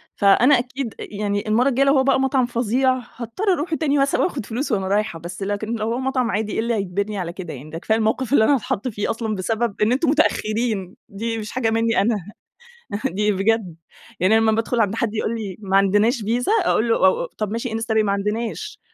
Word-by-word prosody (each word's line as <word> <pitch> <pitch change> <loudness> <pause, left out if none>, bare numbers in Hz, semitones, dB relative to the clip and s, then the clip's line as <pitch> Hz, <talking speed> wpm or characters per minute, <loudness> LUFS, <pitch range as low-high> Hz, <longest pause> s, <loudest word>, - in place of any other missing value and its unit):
فأنا 245 +7 +5
أكيد 250 -1 -4
يعني 205 +1 -3
المرّة 240 +6 +3
الجايّة 275 +2 +2
لو 275 - +5
هو 265 - +4
بقى 270 0 +3
مطعم 265 -1 +2
فظيع، 245 +2 +1 0.2
هاضطر 305 - -1
أروح 330 0 -2
تاني 295 -3 +1
مثلًا 275 0 +2
وآخد 225 - -1
فلوس 250 +4 -3
وأنا 195 -3 0
رايحة، 200 -4 0
بس 175 +4 -7
لكن 205 +3 -2
لو 220 +1 -2
هو - - -2
مطعم 260 -2 0
عادي 210 +1 -2
إيه - - -1
اللي 235 +1 0
هيجبرني 200 +1 -2
على 170 -2 -4
كده 180 -3 -7
يعني؟! 140 +4 -10
ده 165 - -6
كفاية 220 +6 0
الموقف 225 +5 0
اللي 220 - +6
أنا 280 - +4
هاتحط 225 0 -2
فيه 205 -3 -3
أصلًا 225 -2 -3
بسبب 220 +2 -2
إن 215 +3 +3
أنتم 275 +3 +2
مُتأخرين 215 - 0
دي 225 +3 -3
مش 215 -1 -6
حاجة 240 -3 0
مِنّي 225 0 +2
أنا. 225 +2 +2 0.9
دي 210 -3 +1
بجد 195 -3 0 0.4
يعني 200 +5 +4
لمّا 225 0 +3
بادخل 225 +2 0
عند 210 0 +1
حد 225 -2 -1
يقول 225 +2 -1
لي: 200 -5 -5
"ما 195 -2 +1
عندناش 205 +5 +3
فيزا" 240 - 0
أقول 230 +2 +2
له: - - +4
"أُ 375 - +3
أُ - - -9
طب 210 -1 -2
ماشي 230 +1 -3
إنستا 225 0 -2
باي" 220 -1 +3
"ما 200 - 0
عندناش." 220 - -3
225 Hz, 220 wpm, -21 LUFS, 205-250 Hz, 0.9 s, اللي